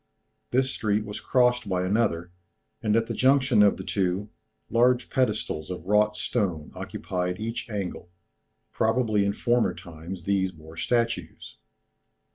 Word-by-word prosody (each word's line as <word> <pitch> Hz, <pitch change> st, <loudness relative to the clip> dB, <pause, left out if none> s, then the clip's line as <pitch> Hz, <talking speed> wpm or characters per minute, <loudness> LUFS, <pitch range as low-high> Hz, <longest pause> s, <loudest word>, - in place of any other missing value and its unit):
This 130 Hz, +1 st, +2 dB
street 105 Hz, 0 st, 0 dB
was 105 Hz, 0 st, -6 dB
crossed 125 Hz, -3 st, +2 dB
by 90 Hz, -1 st, 0 dB
another, 90 Hz, -4 st, 0 dB, 0.5 s
and 105 Hz, -1 st, +1 dB
at 115 Hz, 0 st, +3 dB
the -, -, -4 dB
junction 130 Hz, -4 st, +4 dB
of 100 Hz, -1 st, +5 dB
the -, -, -6 dB
two, 100 Hz, +2 st, -1 dB, 0.4 s
large 120 Hz, +1 st, +2 dB
pedestals 105 Hz, -11 st, -1 dB
of 90 Hz, -2 st, -6 dB
wrought 105 Hz, +2 st, +3 dB
stone 90 Hz, -10 st, -2 dB
occupied 90 Hz, 0 st, -3 dB
each 115 Hz, +2 st, -4 dB
angle, 100 Hz, -4 st, -4 dB, 0.6 s
probably 110 Hz, -2 st, +2 dB
in 100 Hz, 0 st, +1 dB
former 120 Hz, +2 st, +1 dB
times 85 Hz, +2 st, -9 dB
these 95 Hz, 0 st, +1 dB
bore 80 Hz, -1 st, -14 dB
statues. 115 Hz, -4 st, -2 dB
105 Hz, 135 wpm, -26 LUFS, 90-115 Hz, 0.6 s, of